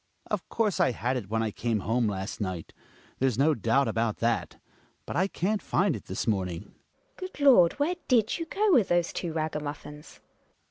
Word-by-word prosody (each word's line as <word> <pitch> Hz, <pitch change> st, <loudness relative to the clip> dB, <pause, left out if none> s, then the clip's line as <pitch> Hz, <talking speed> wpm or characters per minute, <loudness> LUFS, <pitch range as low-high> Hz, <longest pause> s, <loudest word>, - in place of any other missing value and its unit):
Hjalmar. -, -, -14 dB
Of -, -, -2 dB
course 215 Hz, -4 st, 0 dB
I -, -, +4 dB
had 125 Hz, +4 st, -1 dB
it 110 Hz, -7 st, -4 dB
when 115 Hz, +1 st, 0 dB
I 110 Hz, -, -1 dB
came 115 Hz, -1 st, -1 dB
home 115 Hz, +3 st, +1 dB
last 95 Hz, +1 st, -4 dB
might; 95 Hz, -4 st, -4 dB, 0.5 s
there's 130 Hz, -4 st, +1 dB
no 150 Hz, +4 st, +4 dB
doubt 125 Hz, +2 st, +2 dB
about 115 Hz, -1 st, 0 dB
that; 115 Hz, 0 st, -1 dB, 0.5 s
but -, -, -6 dB
I 190 Hz, +3 st, +2 dB
can't 200 Hz, +2 st, -1 dB
find 190 Hz, -2 st, +1 dB
it 105 Hz, -, -9 dB
this 95 Hz, -, -3 dB
morning. 90 Hz, -6 st, -1 dB
GiNA. -, -, -18 dB, 0.6 s
Good 370 Hz, -, -16 dB
Lord! 240 Hz, -12 st, +6 dB
Where 300 Hz, +5 st, 0 dB
did 230 Hz, +2 st, +2 dB
you 330 Hz, -, -4 dB
go 415 Hz, +4 st, +1 dB
with 230 Hz, -, +5 dB
those 175 Hz, -1 st, +1 dB
two 175 Hz, -, -3 dB
ragamuffins? 150 Hz, -1 st, -5 dB
140 Hz, 195 wpm, -28 LUFS, -, 0.6 s, Lord